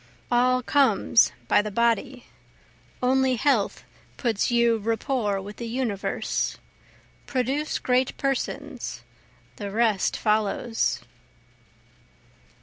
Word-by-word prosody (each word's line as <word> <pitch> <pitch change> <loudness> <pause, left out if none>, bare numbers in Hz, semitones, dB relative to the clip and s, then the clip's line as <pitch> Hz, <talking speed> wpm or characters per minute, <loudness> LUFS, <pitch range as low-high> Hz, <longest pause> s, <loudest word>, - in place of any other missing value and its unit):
All 255 +1 +3
comes 280 +2 +4 0.2
by - - +4
the 210 - -4
body, 235 +4 0 0.8
only 260 0 +3
health 235 -3 +1 0.3
puts 225 -5 0
you 235 -1 +3
rapport 225 -1 -1
with 205 +2 -9
the 235 - -5
universe. 230 -4 -2 0.7
Produce 270 +4 -1
great 255 +1 0
Persons, 275 -2 -3 0.5
the 205 -1 -5
rest 215 -2 +1
follows. 215 +2 0
235 Hz, 90 wpm, -25 LUFS, 215-255 Hz, 0.8 s, comes